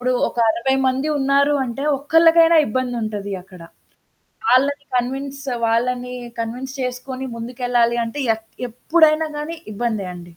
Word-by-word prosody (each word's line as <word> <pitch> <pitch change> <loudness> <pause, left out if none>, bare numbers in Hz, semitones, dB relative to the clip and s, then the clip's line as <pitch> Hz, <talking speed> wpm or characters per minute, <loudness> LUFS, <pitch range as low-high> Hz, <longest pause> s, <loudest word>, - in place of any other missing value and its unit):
ఇప్పుడు 255 0 +1
ఒక - - -7
60 235 +4 +1
మంది 260 +2 0
ఉన్నారు 280 +1 +3
అంటే 255 +2 -4 0.2
ఒక్కళ్ళకైనా 330 +3 +5
ఇబ్బందుంటది 220 -5 -3
అక్కడ. 185 -1 -15 0.9
వాళ్ళని 280 +3 +3
కన్విన్స్ 270 +3 -2 0.2
వాళ్ళని 245 +2 0 0.3
కన్విన్స్ 245 +4 -4
చేసుకొని 255 +1 -4
ముందుకెళ్ళాలి 240 0 0
అంటే 230 +5 -5 0.2
ఎక్ 220 - -16 0.2
ఎప్పుడైనా 315 +5 +3
గానీ 310 +3 -5 0.2
ఇబ్బందే 215 -3 -2
అండి. 175 - -9
255 Hz, 120 wpm, -20 LUFS, 235-280 Hz, 0.9 s, ఒక్కళ్ళకైనా